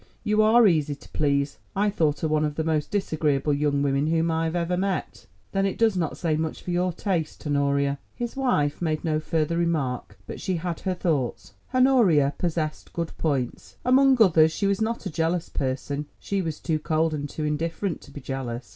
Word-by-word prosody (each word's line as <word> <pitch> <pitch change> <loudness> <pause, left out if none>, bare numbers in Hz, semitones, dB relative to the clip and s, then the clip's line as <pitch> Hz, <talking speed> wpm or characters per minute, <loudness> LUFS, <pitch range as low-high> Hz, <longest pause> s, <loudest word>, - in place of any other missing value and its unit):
You 215 -1 +3
are 225 +2 +6
easy 155 -6 +2
to - - -17
please. 140 -1 0 0.2
I 205 +1 +2
thought 155 -7 0
her 160 - +1
one 155 0 +1
of 150 -1 -1
the 160 - -1
most 155 -2 0
disagreeable 155 -7 0
young 145 0 +1
women 140 +1 +1
whom 165 +1 +1
I 160 0 0
ever 170 +2 -1
met." 190 0 -3 0.2
"Then 195 0 +1
it 195 - -3
does 225 -3 +3
not 170 -4 -1
say 165 -4 0
much 160 0 -3
for 180 - -4
your 180 +1 +1
taste, 170 -4 -3
Honoria." 140 -1 +1 0.2
His 240 -1 -4
wife 165 - +1
made 155 -2 -1
no 155 -1 +1
further 155 +1 -1
remark, 155 -8 -1
but - - -7
she 190 -2 -1
had 170 0 -3
her 185 -1 -2
thoughts. 150 -9 -2 0.2
Honoria 235 - +4
possessed 160 -3 -2
good 170 -1 -3
points: 135 -6 -2
among 265 0 +5
others 160 -7 +6
she 200 - -2
was 200 +1 +1
not 230 +1 -1
a - - -3
jealous 165 +2 -1
person; 140 +2 -3
she 200 -1 -2
was 160 -4 -4
too 160 -2 -1
cold 160 +1 +1
and 145 -1 -3
too 155 - -5
indifferent 165 +4 -2
to - - -15
be 140 0 -9
jealous. 125 -4 -5
160 Hz, 200 wpm, -25 LUFS, 145-185 Hz, 0.2 s, are